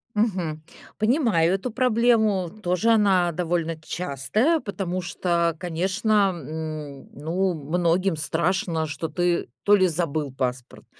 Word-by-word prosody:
Мгм. 180 -8 -1 0.4
Понимаю 215 - +3
эту 195 +6 -2
проблему, 225 -6 +2
тоже 180 +6 +2
она 190 -5 +3
довольно 165 -1 -1
частая, 180 - 0
потому 190 - -3
что, 170 -1 0
конечно, 190 +4 +1
м, 155 -2 -7
ну, 175 +6 -1
многим 170 +4 0
страшно, 165 +1 0
что 150 +2 -4
ты 175 +2 0 0.2
то 205 - +6
ли 185 -2 +4
забыл 155 -4 -2
паспорт, 125 -2 -4
175 Hz, 115 wpm, -24 LUFS, 160-200 Hz, 0.4 s, то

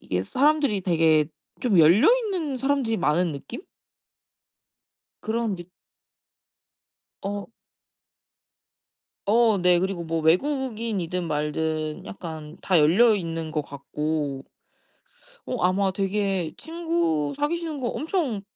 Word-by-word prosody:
이게 90 0 -2
사람들이 280 - +2
되게 160 -4 +3 0.3
좀 220 -8 +2
열려 175 - +6 0.2
있는 330 -10 -2
사람들이 270 -4 0
많은 170 0 +1
느낌? 145 - -7 1.6
그런 225 -1 -1
느 175 - -8 1.6
어. 200 +1 -4 1.8
어 220 -1 +4
네. 180 -1 +4
그리고 190 -1 -2
뭐 165 0 -2
외국인이든 210 - 0
말든 155 +1 -2
약간 160 -4 -8
다 185 -3 +3
열려 195 +10 +5
있는 165 -4 -4
것 155 -1 -1
같고. 145 0 -3 1.0
어 250 - -3
아마 190 +2 +2
되게 195 -3 -1
친구 325 - -1
사귀시는 315 0 -2
거 245 - -2
엄청 300 - -2
190 Hz, 200 characters per minute, -25 LUFS, 160-240 Hz, 1.8 s, 열려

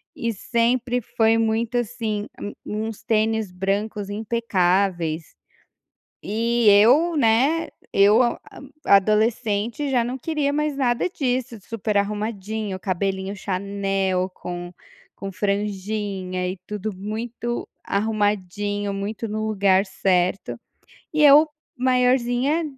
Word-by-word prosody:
e 230 -1 -2
sempre 240 +3 0
foi 225 -1 +2
muito 225 +2 0
assim 220 -3 -2
a - - -12
um 205 - -5 0.3
uns 225 -2 -8
tênis 220 -2 +1
brancos 200 +2 -2
impecáveis. 190 -6 0 0.9
E 230 +2 +1
eu, 260 +12 +5
né 270 +6 +3 0.2
eu 205 +4 +5
a 240 -1 0 0.5
adolescente, 215 +5 +2
já 245 -3 +2
não 250 +2 -4
queria 295 0 -1
mais 300 -1 -1
nada 245 +2 +1
disso, 255 -8 -2
super 215 0 -3
arrumadinho, 210 0 -2
cabelinho 190 +1 -2
chanel, 195 -1 -1
com 175 0 -6 0.4
com 195 0 -7
franjinha 200 -2 -2
e 185 - -4
tudo 210 0 -4
muito 225 +4 -4 0.2
arrumadinho, 205 -1 -1
muito 205 +3 -4
no 215 0 -3
lugar 195 -2 +3
certo. 185 0 0 0.6
E 305 -1 +3
eu, 295 +2 +8 0.3
maiorzinha, 250 +3 +2
215 Hz, 110 wpm, -23 LUFS, 195-240 Hz, 0.9 s, eu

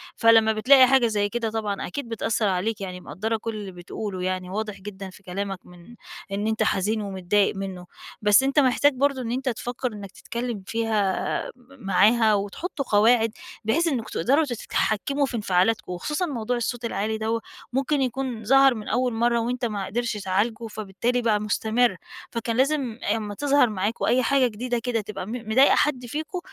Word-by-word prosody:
فلمّا 225 -1 +5
بتلاقي 255 +4 +6
حاجة 260 -2 +4
زي 205 -2 0
كده 230 +1 -2
طبعًا 215 -2 -3
أكيد 245 +6 -6
بتأثر 225 -1 0
عليك، 200 +3 -1
يعني 180 -2 -6
مقدّرة 210 +9 -3
كل 225 0 -5
اللي 205 -2 -6
بتقُوله 185 +2 -6
يعني 185 0 -2
واضح 210 +1 -4
جدًا 195 -1 -8
في 195 +2 -16
كلامك 195 +1 -4
من 180 +6 -15 0.4
إن 205 +2 -1
أنت 220 0 +1
حزين 215 +3 0
ومتضايق 195 +1 0
منه. 190 -2 -6 0.4
بس 210 +4 +5
أنت 275 +2 +2
محتاج 280 +2 +4
برضه 275 0 +1
إن 230 -2 -4
أنت 260 +1 -1
تفكر 245 +1 -4
إنك 200 -2 -9
تتكلم 235 -4 -5
فيها 225 -2 0 0.5
م 255 -2 -17
معاها 215 +3 +4
وتحطوا 210 - -3
قواعد، 225 +2 +4 0.3
بحيث 325 +10 +2
إنكم 255 -8 -1
تقدروا 275 - +2
ت 255 - -4
تتحكموا 275 +5 0
في 255 - -5
انفعالاتكم، 195 0 +1
وخصوصًا 300 - -2
موضوع 245 -5 -2
الصوت 240 0 -3
العالي 215 +1 -2
دوّة 225 +1 -1 0.3
ممكن 275 +2 +1
يكون 255 -2 -2
ظهر 270 +2 +6
من 215 -2 -7
أول 250 -1 0
مرة 235 +1 +2
وأنت 245 +2 -2
ما 205 -4 -3
قدرش 230 +3 -2
تعالجه 210 +4 -1
فبالتالي 215 +3 -2
بقى 220 -3 +2
مستمر، 220 +1 +1 0.4
فكان 230 0 -2
لازم 265 -4 0 0.2
أمّا 210 -2 -4
تظهر 285 -2 +3
معاكم 210 +2 -2
أي 250 +2 +3
حاجة 270 +1 +3
جديدة 240 +2 -3
كده 235 -2 -1
تبقى 210 -2 -6
م - - -6 0.2
مضايقة 265 +5 +6
حد 260 -4 +1
فيكم 310 +8 -4
225 Hz, 175 wpm, -24 LUFS, 205-250 Hz, 0.5 s, بتلاقي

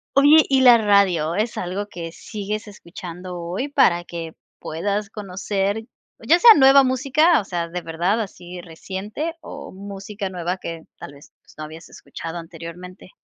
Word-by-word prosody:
Oye, 290 +3 +7
¿y 270 -1 +4
la 245 -2 +8
radio 195 -7 +2
es 215 +3 -1
algo 190 +3 -4
que 165 -4 -7
sigues 210 +3 -6
escuchando 180 -2 -9
hoy, 180 +12 -4
para 180 -12 +3
que 165 -2 -7 0.3
puedas 200 +5 -3
conocer, 200 +1 -3 0.4
ya 320 +10 +4
sea 460 +5 +9
nueva 270 -2 +7
música, 275 +6 +3
o 205 - -6
sea, 170 -3 -3
de 180 - -4
verdad 175 +7 -1
así 180 -3 -7
reciente, 195 - -6
o - - -9
música 200 +1 -7
nueva 180 0 -3
que 165 -2 -7 0.2
tal 145 - -10
vez, 140 0 -17
pues, - - -21
no 155 - -6
habías 160 +2 -10
escuchado 165 +1 -8
anteriormente? 170 +3 -10
195 Hz, 160 wpm, -22 LUFS, 170-220 Hz, 0.4 s, sea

